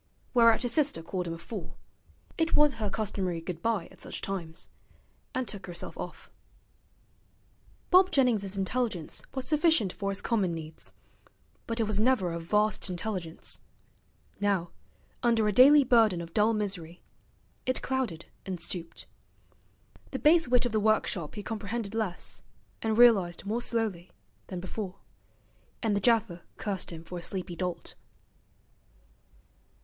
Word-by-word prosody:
Whereat 230 Hz, -1 st, +5 dB
his 245 Hz, -, 0 dB
sister 285 Hz, -, +2 dB
called 180 Hz, +1 st, -3 dB
him 165 Hz, -, -3 dB
a -, -, -8 dB
fool 185 Hz, +3 st, -8 dB, 0.6 s
(it 325 Hz, 0 st, +1 dB
was 295 Hz, -1 st, +5 dB
her 210 Hz, -, 0 dB
customary 190 Hz, -4 st, -2 dB
goodbye 180 Hz, +3 st, -2 dB
at -, -, -16 dB
such -, -, -6 dB
times), 170 Hz, -4 st, -5 dB, 0.7 s
and 255 Hz, -2 st, -1 dB
took 200 Hz, -2 st, -5 dB
herself 175 Hz, -1 st, -6 dB
off. -, -, -8 dB, 1.6 s
Bob 370 Hz, +1 st, +7 dB
Jennings's 220 Hz, -, +2 dB
intelligence 195 Hz, -4 st, -2 dB
was 265 Hz, -1 st, -2 dB
sufficient 300 Hz, -, +3 dB
for 200 Hz, -1 st, -3 dB
his 195 Hz, 0 st, -3 dB
common 195 Hz, -7 st, +1 dB
needs, 160 Hz, -1 st, -8 dB, 0.7 s
but 230 Hz, 0 st, -2 dB
it -, -, +3 dB
was 210 Hz, -1 st, +1 dB
never 215 Hz, -7 st, +2 dB
a 170 Hz, -, -3 dB
vast 210 Hz, +4 st, +1 dB
intelligence. 180 Hz, -2 st, -4 dB, 0.8 s
Now, 195 Hz, -4 st, +1 dB, 0.5 s
under 230 Hz, -3 st, +3 dB
a -, -, +3 dB
daily 280 Hz, +6 st, +8 dB
burden 225 Hz, -7 st, +4 dB
of 170 Hz, -1 st, -7 dB
dull 215 Hz, +2 st, +4 dB
misery, 185 Hz, -5 st, -3 dB, 0.6 s
it 255 Hz, -, 0 dB
clouded 250 Hz, -11 st, -2 dB, 0.2 s
and 185 Hz, -2 st, -4 dB
stooped. 170 Hz, -1 st, -3 dB, 1.0 s
The -, -, -3 dB
base 320 Hz, +1 st, +5 dB
wit 250 Hz, 0 st, +4 dB
of 245 Hz, -, 0 dB
the 215 Hz, -, +2 dB
workshop 210 Hz, -6 st, +1 dB
he 210 Hz, -, -5 dB
comprehended 215 Hz, 0 st, -3 dB
less, 215 Hz, -6 st, -2 dB, 0.4 s
and 220 Hz, -1 st, 0 dB
realized 200 Hz, -8 st, +5 dB
more 220 Hz, +4 st, -1 dB
slowly, 220 Hz, -8 st, -1 dB, 0.4 s
than 185 Hz, -, -5 dB
before; 185 Hz, +1 st, -5 dB, 0.9 s
and 215 Hz, -3 st, +2 dB
the 200 Hz, -, 0 dB
gaffer 220 Hz, -5 st, +2 dB, 0.2 s
cursed 200 Hz, -3 st, -3 dB
him 165 Hz, -1 st, -8 dB
for 175 Hz, +1 st, -6 dB
a -, -, -9 dB
sleepy 180 Hz, 0 st, -4 dB
dolt. 175 Hz, -1 st, -4 dB
205 Hz, 145 wpm, -29 LUFS, 180-235 Hz, 1.6 s, daily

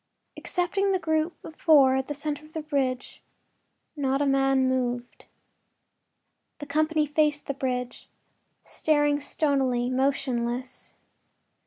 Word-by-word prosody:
Excepting 390 Hz, +2 st, -1 dB
the -, -, +3 dB
group 320 Hz, 0 st, -1 dB
of 320 Hz, -, -10 dB
four 285 Hz, -5 st, +5 dB
at 265 Hz, 0 st, -1 dB
the 295 Hz, -, -4 dB
center 295 Hz, 0 st, -4 dB
of 305 Hz, +1 st, -17 dB
the 315 Hz, -, -4 dB
bridge, 270 Hz, -4 st, -2 dB, 0.7 s
not 275 Hz, -2 st, 0 dB
a 290 Hz, -, +1 dB
man 270 Hz, -1 st, +2 dB
moved. 245 Hz, -1 st, -2 dB, 1.3 s
The 290 Hz, -, -7 dB
company 310 Hz, +1 st, +1 dB
faced 295 Hz, 0 st, +1 dB
the 280 Hz, -, -2 dB
bridge, 250 Hz, -2 st, -4 dB, 0.5 s
staring 295 Hz, -1 st, +1 dB
stonily, 265 Hz, -4 st, 0 dB
motionless. 255 Hz, -2 st, -2 dB
280 Hz, 120 wpm, -26 LUFS, 260-305 Hz, 1.3 s, four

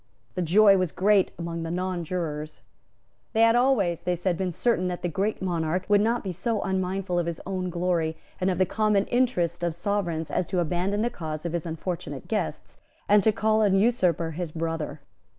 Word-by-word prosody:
The 180 Hz, -, -2 dB
joy 195 Hz, +4 st, +6 dB
was 185 Hz, -3 st, 0 dB
great 200 Hz, 0 st, +3 dB
among 170 Hz, -1 st, -4 dB
the 165 Hz, -, -4 dB
nonjurors. 170 Hz, -4 st, -3 dB, 0.7 s
They 225 Hz, -, +2 dB
had 230 Hz, 0 st, +6 dB
always, 225 Hz, -10 st, +2 dB
they 180 Hz, 0 st, 0 dB
said, 175 Hz, +1 st, 0 dB
been 185 Hz, +1 st, -2 dB
certain 185 Hz, 0 st, +1 dB
that 180 Hz, -1 st, -4 dB
the -, -, +1 dB
Great 195 Hz, +5 st, -2 dB
Monarch 175 Hz, 0 st, -1 dB
would 205 Hz, 0 st, +5 dB
not 230 Hz, +3 st, +1 dB
be 190 Hz, -, -3 dB
so 210 Hz, +5 st, -1 dB
unmindful 190 Hz, -1 st, -1 dB
of 170 Hz, -, -1 dB
his 170 Hz, -2 st, -3 dB
own 185 Hz, -1 st, -2 dB
glory 170 Hz, -2 st, 0 dB, 0.2 s
and 185 Hz, 0 st, +1 dB
of 180 Hz, -, 0 dB
the 185 Hz, -, +3 dB
common 210 Hz, 0 st, +1 dB
interest 180 Hz, -9 st, +1 dB
of 170 Hz, -2 st, -1 dB
Sovereigns 175 Hz, -4 st, -2 dB
as 180 Hz, -, 0 dB
to 185 Hz, -, -2 dB
abandon 180 Hz, +5 st, 0 dB
the 240 Hz, -, 0 dB
cause 155 Hz, -6 st, -6 dB
of 170 Hz, -, -2 dB
his 170 Hz, -1 st, -2 dB
unfortunate 165 Hz, +2 st, -5 dB
guests, -, -, -3 dB, 0.3 s
and 205 Hz, 0 st, +6 dB
to 220 Hz, -, +4 dB
call 215 Hz, +1 st, +2 dB
an 200 Hz, -3 st, +3 dB
usurper 185 Hz, -7 st, +2 dB
his 165 Hz, 0 st, -4 dB
brother. 165 Hz, -1 st, -3 dB
180 Hz, 195 wpm, -26 LUFS, 170-205 Hz, 0.7 s, joy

